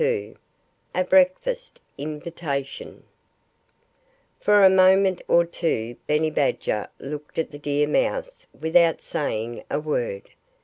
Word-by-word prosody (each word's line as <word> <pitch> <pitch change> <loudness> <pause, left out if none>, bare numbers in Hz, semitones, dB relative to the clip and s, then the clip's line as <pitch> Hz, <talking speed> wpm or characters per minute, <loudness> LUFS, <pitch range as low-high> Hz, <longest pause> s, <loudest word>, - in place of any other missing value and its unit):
XXII 465 -2 -1 0.6
A 185 - +2
BREAKFAST 190 - +1 0.2
INVITATION 150 -2 -5 1.4
For 205 -1 +4
a - - +10
moment 190 0 +4
or 170 0 +4
two 120 -9 -2
Benny 155 +1 +1
Badger 135 -7 0
looked 150 +1 -8
at 160 - -1
the 145 - -10
deer 145 0 0
mouse - - -1
without 165 +1 +3
saying 115 -5 -3
a - - -1
word. 125 -10 -3
160 Hz, 115 wpm, -24 LUFS, 145-190 Hz, 1.4 s, a